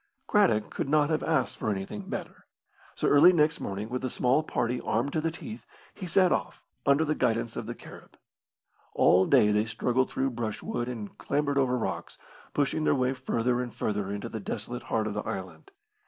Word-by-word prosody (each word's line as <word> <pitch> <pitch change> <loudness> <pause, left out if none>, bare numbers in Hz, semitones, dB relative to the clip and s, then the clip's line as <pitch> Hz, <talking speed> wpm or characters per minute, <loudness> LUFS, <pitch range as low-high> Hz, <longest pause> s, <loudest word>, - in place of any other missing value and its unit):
Craddock 180 - +2
could - - -3
not 150 +1 +3
have 155 - +1
asked 160 -1 0
for - - -2
anything 100 0 -4
better; - - -6 0.5
so - - 0
early 145 +5 +7
next 155 -2 +2
morning, 100 +2 -4
with 125 +2 -4
a 130 - -1
small 125 +5 +2
party 125 -4 -1
armed 125 +6 -1
to 155 - +1
the 165 - 0
teeth, 215 +7 -9 0.3
he 185 - -7
set 185 +1 +4
off, - - -2 0.2
under 140 +3 +4
the 155 - +1
guidance 115 -4 0
of - - -5
the - - -5
Carib. - - -14 0.8
All 95 +1 +5
day 105 - +5
they 105 +1 +2
struggled 125 +3 0
through 135 0 -1
brushwood 120 +1 -3
and 110 -5 -6
clambered 145 0 0
over 125 -2 +2
rocks, 115 - -4 0.3
pushing 145 +2 0
their - - +3
way 130 0 +1
further 125 -1 0
and 125 -1 -5
further 105 -2 -2
into 100 0 -4
the 110 - -5
desolate 110 +4 -5
heart 110 -1 +1
of 110 - -2
the 105 - -2
island. 95 - -6
125 Hz, 195 wpm, -28 LUFS, 110-145 Hz, 0.8 s, early